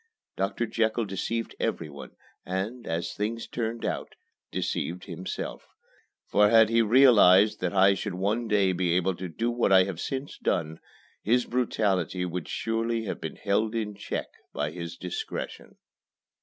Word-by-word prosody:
Doctor 95 +5 -1
Jekyll 115 0 0
deceived 110 +4 -3
everyone, 75 -3 -4 0.3
and 100 +7 -4
as 80 +1 -2
things 115 +3 -3
turned 115 -1 -3
out - - -3 0.4
deceived 90 +2 -2
himself; 90 0 -6 0.6
for 105 0 +4
had 110 -1 +6
he 115 0 +4
realized 110 -4 +6
then - - -1
that - - -3
I 95 +1 +7
should 95 - -4
one 105 +6 0
day 100 -3 +3
be 90 -1 +1
able 90 +1 +2
to 95 -1 -5
do 115 +9 -1
what 120 -4 +1
I 95 -1 +7
have 95 -3 -5
since 135 +1 -4
done, 80 0 -1 0.4
his 120 +3 +2
brutality 100 -7 0
would 90 -1 -4
surely 115 0 -1
have 105 - -5
been - - -5
held 110 +3 0
in 105 -2 -2
check 100 - -4 0.3
by 75 +1 -2
his 85 0 -7
discretion. 90 -1 -6
100 Hz, 155 wpm, -27 LUFS, 90-115 Hz, 0.6 s, I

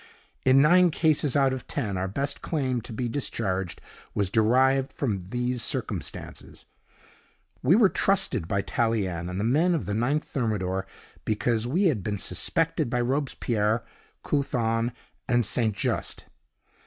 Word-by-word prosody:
In 130 +1 +6
nine 180 +3 +6
cases 155 -4 +1
out 135 -2 +3
of 130 - -6
ten, 105 -9 -2
our 95 +1 -1
best 140 +8 -1
claim 130 -6 -1
to 115 - -9
be 120 +2 -2
discharged 95 -8 -2 0.4
was 100 -2 0
derived 130 +5 +3
from 100 -9 -3
these 125 +1 -1
circumstances. - - -4 1.0
We 155 +8 +4
were 220 -2 +6
trusted 190 - +1
by 100 +2 0
Tallien 95 -7 -1
and 90 +1 -4
the - - -1
men 155 +10 +3
of 135 - -2
the 105 - -3
Ninth 135 +8 +1
Thermidor, 95 -7 -2 0.4
because 110 +1 0
we 170 +11 +1
had 150 - +2
been 105 +2 -2
suspected 110 - 0
by 125 - 0
Robespierre, 120 -4 0 0.4
Couthon, 120 -4 0 0.4
and 120 -2 +3
St. 110 -1 +1
Just. - - -2
120 Hz, 140 wpm, -26 LUFS, 105-140 Hz, 1.0 s, In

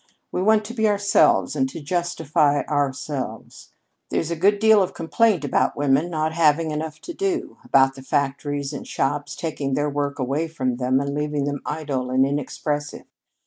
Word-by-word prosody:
We - - -1
want 215 +2 +3
to 235 - -6
be 220 -2 +1
ourselves 205 0 +3
and 265 0 +1
to 260 - -7
justify 155 -3 +1
ourselves. 140 -5 -3 0.4
There's 165 - -1
a - - 0
good 200 +5 +3
deal 220 0 +5
of 185 - -2
complaint 180 0 +1
about 140 - +1
women 145 +3 +2
not 160 -1 -1
having 160 -1 +3
enough 155 0 -4
to 345 - -7
do 380 0 -2
about 135 0 +4
the 135 - -11
factories 140 0 -2
and - - -7
shops 145 +1 -2
taking 145 -5 -3
their 145 0 0
work 140 0 -2
away 140 +5 -1
from 130 -6 -2
them 130 +1 +1
and 140 0 -2
leaving 150 -1 -1
them 145 0 -3
idle 145 -5 -3
and 130 +1 +3
inexpressive. 145 +1 -3
150 Hz, 175 wpm, -23 LUFS, 140-170 Hz, 0.4 s, deal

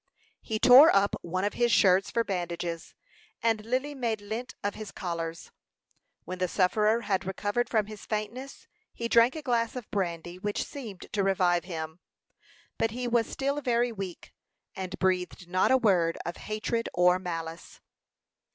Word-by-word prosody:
He 220 - -2
tore 260 +7 +9
up 200 +1 +3
one 185 +2 -2
of 205 - 0
his 240 -1 +2
shirts 190 -1 +4
for 230 - +1
bandages, 175 -3 -4 0.5
and 225 -2 +1
Lily 255 +6 -1
made 235 -5 -2
lint 220 +5 -6
of 205 - +1
of - - -13
his 215 -2 -8
collars. 165 -2 -5 0.7
When 185 +2 -6
the 185 - +1
sufferer 210 +5 +2
had 195 -4 0
recovered 205 +5 -1
from 215 -3 +2
his 215 0 -10
faintness 225 +6 -5 0.3
he 235 - -3
drank 235 +3 +5
a 310 - -6
glass 235 -4 0
of 245 -4 -6
brandy, 175 -2 -3
which 205 +2 -2
seemed 220 -10 -8
to 205 - +1
revive 180 -3 +2
him. 160 -2 -6 0.8
But 225 - +2
he 245 +3 -4
was 235 -1 +2
still 280 +2 -2
very 240 -2 +1
weak, 195 -5 -7 0.4
and 190 -1 -5
breathed 180 -1 -1
not 185 +1 +2
a 260 - +6
word 180 -8 +2
of 170 +1 -4
hatred 215 +2 -2
or 180 +1 +4
malice. 165 -2 -6
205 Hz, 165 wpm, -28 LUFS, 180-235 Hz, 0.8 s, tore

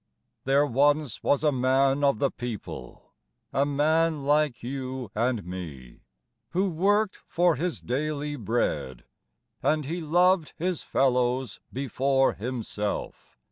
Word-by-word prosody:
There 140 +2 +4
once 145 -1 +2
was 145 - +2
a 150 - +4
man 135 +2 +2
of 140 -5 +3
the 135 +4 +1
people, 110 - -7 0.4
A 140 +1 +2
man 155 +1 +2
like 145 -3 +2
you 130 -3 -5
and 115 -2 0
me, 80 -9 -8 0.5
Who 190 +2 +2
worked 200 +5 +1
for 175 -1 +3
his 170 +5 -2
daily 145 +3 -2
bread, 85 - -2 0.6
And 155 -1 +1
he 170 +5 -3
loved 175 +1 +3
his 180 0 -1
fellows 125 -2 +1
before 135 +1 +1
himself. 110 -3 -4
135 Hz, 120 wpm, -27 LUFS, 125-155 Hz, 0.6 s, There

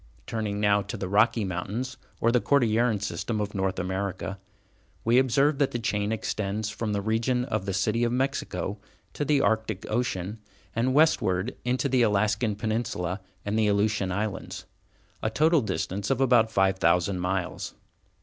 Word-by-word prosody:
Turning 110 -3 -3
now 105 -1 +3
to 100 +1 -6
the 95 - -3
Rocky 105 +3 +3
Mountains 100 +8 -3 0.2
or 115 - +3
the 125 0 +3
Cordilleran 115 -5 +2
System 105 +3 -3
of 105 -1 -2
North 95 -1 -1
America, 95 0 -3 0.7
we 120 +3 +5
observe 135 +3 +2
that 140 - +3
the - - -3
chain 105 -2 -1
extends 105 -1 -2
from 110 0 -3
the 100 -1 -1
region 115 +3 +1
of 100 -7 -2
the - - 0
City 110 +4 +1
of 120 - +1
Mexico 125 -6 -2 0.3
to - - -2
the 145 -1 +3
Arctic 110 -2 0
Ocean, 110 -3 -2 0.4
and 125 +3 +1
westward 115 - +3
into 125 +3 0
the 130 -2 +2
Alaskan 105 0 +2
Peninsula 105 -4 -2 0.2
and 105 +2 0
the 110 - +3
Aleutian 100 -2 +1
Islands, 100 +1 -4 0.6
a 110 - 0
total 155 +6 +3
distance 100 -1 -3
of 135 - +1
about 120 -4 +4
five 95 -2 +2
thousand 90 +2 +2
miles. 90 0 -2
105 Hz, 160 wpm, -27 LUFS, 100-120 Hz, 0.7 s, we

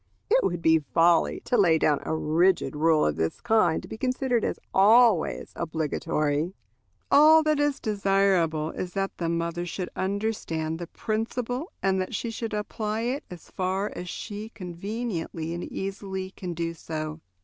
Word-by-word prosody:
It - - +5
would 175 -1 -1
be 160 0 +5
folly 165 +3 +2
to - - -1
lay 175 -6 +5
down 150 -2 +2
a - - -2
rigid 165 +2 +2
rule 155 0 +3
of 75 0 0
this 80 0 -1
kind 215 -8 +2
to - - -9
be 220 - -8
considered 255 -2 0
as - - -2
always 215 -1 +4
obligatory. 160 0 -1 0.6
All 310 +2 +7
that 305 -1 +2
is 290 -1 +1
desirable 195 -6 +1
is 180 -1 -5
that 195 0 -2
the 170 -1 -1
mother 170 +1 -1
should 175 +1 -4
understand 190 -5 -2
the 175 - -5
principle, 245 - -3
and 190 0 +2
that 185 - -4
she 230 +3 -3
should 225 -1 -4
apply 215 +1 -3
it 250 +5 -2
as 175 -2 -11
far 190 +2 -1
as 180 0 -6
she 210 +3 -6
conveniently 180 -4 -4
and 175 - -4
easily 190 -1 -5
can 180 -3 -6
do 165 0 -2
so. 155 -1 -5
185 Hz, 160 wpm, -26 LUFS, 165-220 Hz, 0.6 s, All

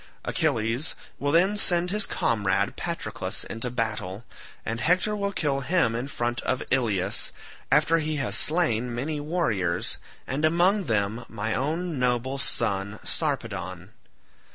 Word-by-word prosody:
Achilles 115 +6 0 0.2
will 145 0 0
then 185 +6 +4
send 180 -3 +3
his 210 0 +2
comrade 100 -4 +1
Patroclus - - -3
into 115 +2 -4
battle, 110 -3 -3 0.4
and 115 +1 -2
Hector 185 +5 +2
will 200 -1 -1
kill 145 -7 0
him 135 -3 +2
in 120 +3 -2
front 120 -4 -2
of 130 - -1
Ilius 105 -7 +1 0.4
after 165 +1 +5
he 155 0 -1
has 135 -3 +1
slain 125 -8 +2
many 150 +5 -2
warriors, 115 - -1 0.3
and 140 +4 -2
among 175 +5 +3
them 110 0 0
my 110 0 -2
own 155 +5 -1
noble 125 +2 0
son 100 -4 0
Sarpedon. 100 - -2
125 Hz, 130 wpm, -26 LUFS, 110-160 Hz, 0.4 s, after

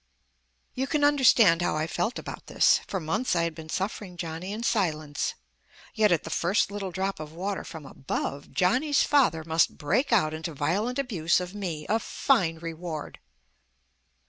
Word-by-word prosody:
You 265 +1 -2
can 300 -1 0
understand 250 -11 +5
how 175 - 0
I 155 +1 0
felt 220 +8 -2
about - - -8
this. - - +4
For 190 - -2
months 185 +8 -1
I 170 - +2
had 170 -1 -1
been 160 0 -10
suffering 190 0 -4
Johnny 170 +3 -5
in 220 +3 -4
silence; 155 -10 -1 0.6
yet, 215 -3 +3
at 170 -3 +2
the - - -7
first 190 +4 +1
little 200 -2 -4
drop 190 +1 -3
of 155 0 -8
water 190 +4 -3
from 160 -3 -9
above, 140 +1 -4
Johnny's 260 +10 +2
father 245 - +3
must 160 +1 +1
break 210 - 0
out 155 -9 +3
into 160 0 -5
violent 205 - 0
abuse 195 - +1
of 180 +1 -6
me. 175 -7 -4
A 220 +4 +2
fine 190 -9 +1
reward! 165 -1 -6
180 Hz, 170 wpm, -27 LUFS, 160-215 Hz, 0.6 s, understand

